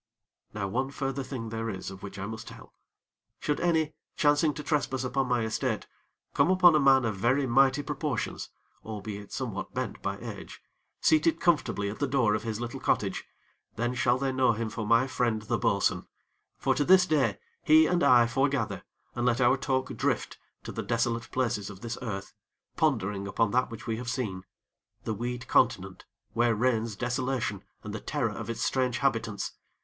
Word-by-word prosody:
Now 105 -2 -3
one 130 +7 -1
further 135 -1 -3
thing 125 -4 -5
there 115 0 -3
is 95 -2 -5
of 95 0 -10
which 100 -1 -8
I 100 - -4
must 110 +1 -7
tell. - - -12 0.7
Should 150 - -1
any, 160 -3 +1 0.2
chancing 150 +1 +3
to 150 - -6
trespass 135 -3 0
upon 130 +1 0
my 125 -2 +1
estate, 110 0 -1 0.5
come - - +3
upon 185 -2 +6
a 155 - +4
man 135 -3 +5
of 110 -3 -2
very 130 +7 +2
mighty 135 +3 +3
proportions, 145 -3 -3 0.3
albeit 105 -1 -7
somewhat - - -4
bent - - -3
by - - -2
age, - - -8 0.4
seated 160 +1 +3
comfortably 120 - +1
at 105 +1 -5
the - - +1
door 125 -6 +2
of 105 - 0
his 110 -1 -4
little 120 0 -5
cottage, - - 0 0.5
then 120 +2 -1
shall 120 0 +2
they 135 0 -1
know 130 -2 +3
him 110 0 -3
for 110 0 -4
my 115 +3 +5
friend 120 -5 -1
the - - -1
bo'sun; - - +1 0.5
for - - +1
to 145 - +1
this 185 +3 +6
day 155 -6 +2
do - - -23 0.2
he 155 +1 +6
and 175 +2 +1
I 125 -4 +6
fore 135 +4 +1
gather, 140 -1 -2 0.3
and 120 - -2
let 125 0 +2
our 125 +1 +5
talk 130 -1 -1
drift - - -1 0.2
to - - -6
the - - -4
desolate 115 -1 -1
places 120 -6 -1
of 95 -2 -11
this 115 -1 -5
earth, 100 -6 -5 0.4
pondering 105 - 0
upon 100 +2 +1
that 125 +3 +2
which 115 -1 -9
we 115 -1 -2
have 120 0 -5
seen 100 -7 -3 0.6
the 110 - -2
weed 120 +4 -4
continent, - - +1 0.3
where 120 -1 +2
reigns 115 -1 0
desolation 120 -3 -2 0.2
and 105 - -6
the 110 - -4
terror 130 -8 -1
of 110 +2 -6
its 115 - -3
strange 125 -2 +1
habitants. 115 -6 -1
120 Hz, 185 wpm, -28 LUFS, 110-135 Hz, 0.7 s, upon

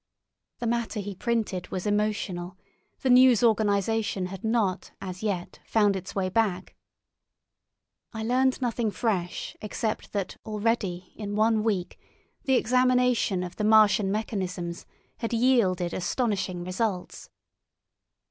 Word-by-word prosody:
The 240 - -4
matter 235 -1 -1
he 205 0 -4
printed 210 -4 -2
was 185 - -4
emotional; 205 -4 -1 0.4
the 260 - 0
news 250 -2 +6
organisation 215 -2 +1
had 185 +1 -7
not 220 -5 0
as 185 -1 -7
yet 195 -5 -3
found 205 -3 +2
its 190 0 -6
way 190 -2 0
back. 190 -2 0 1.4
I 220 -2 -5
learned 255 +3 +1
nothing 235 -2 0
fresh 190 -4 -2
except 215 +1 -3
that 200 -2 -3
already 210 -4 -2
in 205 -1 -4
one 220 +1 +3
week 200 -5 -1 0.5
the 265 - +3
examination 250 -5 +2
of 180 -1 -7
the 210 - -2
Martian 215 -2 +5
mechanisms 185 -5 -3 0.3
had 230 0 -3
yielded 225 -8 +2
astonishing 190 -2 -1
results. 185 +1 -3
210 Hz, 120 wpm, -27 LUFS, 185-230 Hz, 1.4 s, news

